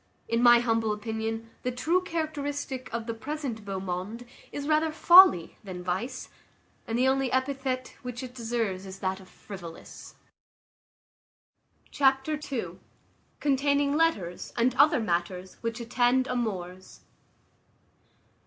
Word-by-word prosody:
In 230 +1 +1
my 240 -1 +8
humble 225 -2 +1
opinion, 225 +1 -4
the 250 - -1
true 325 +9 +1
characteristic 290 -6 -4
of 230 0 -3
the 230 - -3
present 260 -2 -5
beau 195 -2 -4
monde 190 +6 -5 0.3
is 285 0 -5
rather 310 +1 +2
folly 340 - +7
than 185 -3 -7
vice, 225 +9 -3 0.6
and 225 - -1
the 255 +2 +3
only 265 -1 +1
epithet 260 -1 -1
which 250 0 -6
it 250 -1 -8
deserves 225 -6 -2
is 190 0 -8
that 190 0 -2
of 185 -1 -15
frivolous. 175 -5 -10 1.8
Chapter 270 +2 +2
ii. 250 -4 -4 0.6
Containing 285 0 +2
letters 210 - 0
and 240 +1 +3
other 280 +1 +5
matters 180 -2 -2
which 230 +1 -3
attend 245 +2 +2
amours. 190 -7 -4
240 Hz, 125 wpm, -28 LUFS, 205-275 Hz, 1.8 s, my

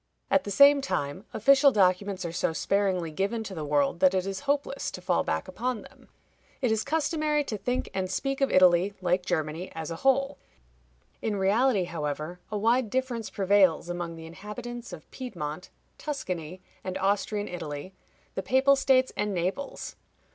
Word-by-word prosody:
At 280 - +3
the - - -4
same 280 +7 +7
time, 180 - -3
official 275 0 +5
documents 190 -2 +2
are 170 - -3
so 165 - -1
sparingly 190 -2 0
given 200 +7 -1
to 205 - -7
the 160 -4 -5
world 145 +2 +1
that 185 0 +4
it 185 -1 0
is 195 0 -3
hopeless 395 - 0
to - - -8
fall - - +1
back - - -2
upon 250 -3 -3
them. - - -18 0.5
It 250 -4 +1
is 220 -1 +1
customary 305 0 0
to 230 - -4
think 245 +5 -2
and 190 -1 -2
speak 275 +5 -2
of 275 - +3
Italy, 185 +2 +4
like 180 0 +1
Germany, 160 +1 -2
as 160 0 -5
a 165 - -4
whole. 275 +3 +2 0.8
In 215 -2 -1
reality, 205 +2 +3
however, 155 +1 -4
a 210 - -1
wide 230 +2 +2
difference 250 -2 -2
prevails 190 -4 +3
among 175 -1 -4
the 165 0 -9
inhabitants 210 +8 -8
of - - -10
Piedmont, 180 - -6 0.3
Tuscany, 185 - -5 0.2
and 185 0 -3
Austrian 205 +2 0
Italy, 165 0 -6 0.4
the - - -2
Papal 265 +5 +4
States, 260 -1 +3
and 210 -2 -1
Naples. 185 +11 -3
195 Hz, 170 wpm, -28 LUFS, 175-255 Hz, 0.8 s, same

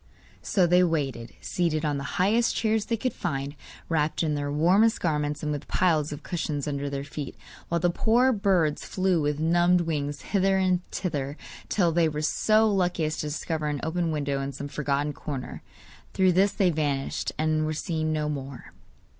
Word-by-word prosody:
So 190 -3 +2
they 180 +1 +5
waited, 140 -9 -1
seated 165 -4 -1
on 145 -2 0
the - - -5
highest 220 +6 +3
chairs 220 -1 +1
they 230 - -1
could 255 +3 -2
find, 140 -3 -3 0.3
wrapped 155 0 0
in 155 -2 0
their 145 -1 -2
warmest 185 +9 +3
garments, 150 -3 -1
and 150 - -1
with 145 -1 -4
piles 155 -5 +2
of 145 - -7
cushions 155 -5 -3
under 140 -1 -2
their 140 0 -4
feet, 145 -1 -6 0.3
while 170 - +1
the 175 +1 +2
poor 240 +7 +3
birds 190 -8 +1
flew 185 -3 +1
with 145 0 -1
numbed 175 +2 +3
wings 145 -3 -2
hither 195 -1 +2
and 185 -1 +2
thither, 145 -5 -3 0.3
till 175 -5 +2
they 165 -1 +3
were 150 0 -4
so 215 +8 +3
lucky 180 -5 +1
as 155 +1 -2
to 150 - -3
discover 155 +1 -3
an 145 -1 -2
open 165 +1 -1
window 140 -2 -1
in 135 0 -3
some 145 +1 -6
forgotten 145 0 -1
corner. 140 -3 -6 0.5
Through 185 -1 +4
this 195 +3 +3
they 185 -3 +2
vanished, 145 -3 -1
and 155 0 +1
were 155 - -1
seen 155 -1 -2
no 155 -1 -1
more. 140 -3 -6
155 Hz, 185 wpm, -26 LUFS, 145-180 Hz, 0.5 s, they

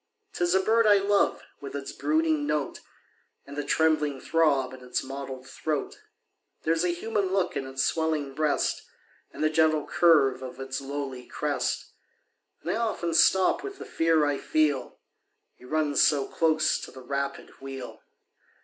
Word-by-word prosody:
'Tis 175 +1 +1
a - - +5
bird 220 +3 +3
I 205 -1 +7
love, 200 +1 +2 0.2
with 140 0 -8
its 140 -1 -5
brooding 155 +1 +1
note, 150 -2 -1 0.7
And 140 - -10
the 145 - -2
trembling 150 -2 +1
throb 140 -6 +1
in 130 -1 -11
its 125 0 -2
mottled 135 -1 -7
throat; 150 +2 -3 0.6
There's 165 +1 +1
a 180 - +2
human 200 +3 -1
look 190 -2 0
in 135 -1 -3
its 130 0 -1
swellinor 155 -4 0
breast, 150 +1 0 0.5
And - - -5
the 155 - +4
gentle 155 -1 +3
curve 145 -7 +4
of 130 0 -8
its 135 0 -4
lowly 135 -2 -5
crest; - - -2 0.7
And - - -2
I - - 0
often 220 -7 -1
stop 185 +3 +4
with 400 0 -7
the - - -8
fear 165 -2 +2
I 145 -1 0
feel 150 -5 0 0.3
— - - -51
He - - -16
runs 150 +1 +1
so 140 -3 +3
close 155 -1 +2
to - - -8
the 130 0 -12
rapid 140 +1 -3
wheel. 135 -2 -8
150 Hz, 165 wpm, -27 LUFS, 135-165 Hz, 0.7 s, I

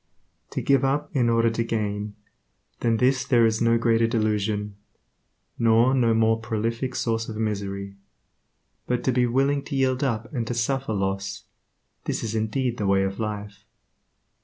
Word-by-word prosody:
To - - -4
give 135 -1 +3
up 140 +3 -1
in 120 -3 +3
order 115 0 +3
to 115 +1 -1
gain, 105 -2 -3 0.6
than 115 -1 +1
this 130 +2 +2
there 120 -3 +4
is 110 -1 +1
no 115 0 +4
greater 115 0 +2
delusion, 105 -2 -1 0.8
nor 115 +3 +4
no 120 -4 +3
more 110 0 +3
prolific 115 +3 -2
source 115 -1 -1
of 110 - -6
misery; 100 -2 -3 0.9
but 125 -1 -1
to 130 - +2
be 125 0 +2
willing 135 +3 +1
to 140 - -5
yield 130 0 +1
up 115 -1 -2
and 120 -4 -2
to 120 - -2
suffer 130 +1 -1
loss, 100 0 -2 0.6
this - - -2
is 110 -1 -3
indeed 115 +3 -1
the 105 - -1
Way 95 0 +3
of 95 +2 -3
Life. 105 -1 -5
115 Hz, 160 wpm, -25 LUFS, 105-125 Hz, 0.9 s, there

